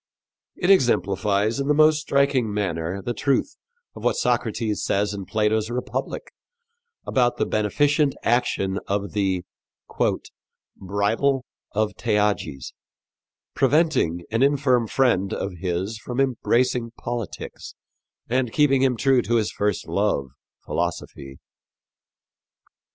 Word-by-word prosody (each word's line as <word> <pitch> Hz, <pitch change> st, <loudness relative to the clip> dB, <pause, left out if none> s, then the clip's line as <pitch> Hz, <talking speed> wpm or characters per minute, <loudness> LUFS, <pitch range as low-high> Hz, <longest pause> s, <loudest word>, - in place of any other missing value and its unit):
It 185 Hz, +1 st, +2 dB
exemplifies 105 Hz, -, +2 dB
in 140 Hz, -, -1 dB
the 150 Hz, -, +3 dB
most 155 Hz, 0 st, +5 dB
striking 140 Hz, -6 st, +1 dB
manner 95 Hz, -2 st, -2 dB
the 120 Hz, -, -2 dB
truth 140 Hz, -, 0 dB, 0.4 s
of -, -, -10 dB
what -, -, +2 dB
Socrates 115 Hz, -, 0 dB
says 105 Hz, +1 st, 0 dB
in 100 Hz, -2 st, -6 dB
Plato's 110 Hz, +1 st, 0 dB
Republic 125 Hz, +1 st, -4 dB, 0.7 s
about 120 Hz, -2 st, +1 dB
the -, -, +1 dB
beneficent 140 Hz, +7 st, +1 dB
action 100 Hz, -5 st, +1 dB
of 100 Hz, 0 st, -2 dB
the 95 Hz, -3 st, 0 dB, 1.3 s
"bridle 110 Hz, +8 st, 0 dB, 0.3 s
of 105 Hz, -1 st, 0 dB
Theages," 100 Hz, -10 st, -1 dB, 0.8 s
preventing 135 Hz, -, +2 dB
an 115 Hz, +2 st, 0 dB
infirm 135 Hz, -4 st, +3 dB
friend 110 Hz, -6 st, +1 dB
of 100 Hz, -, -3 dB
his 95 Hz, +4 st, -2 dB
from 125 Hz, +4 st, -5 dB
embracing 125 Hz, -2 st, +1 dB
politics 120 Hz, -5 st, -6 dB, 0.5 s
and 125 Hz, 0 st, 0 dB
keeping 135 Hz, -2 st, +3 dB
him 130 Hz, -3 st, +2 dB
true 135 Hz, 0 st, +3 dB
to 120 Hz, -, -1 dB
his 110 Hz, -2 st, +1 dB
first 105 Hz, -2 st, -1 dB
love 70 Hz, -1 st, 0 dB, 0.4 s
philosophy. 70 Hz, 0 st, -4 dB
115 Hz, 110 wpm, -23 LUFS, 100-135 Hz, 1.3 s, most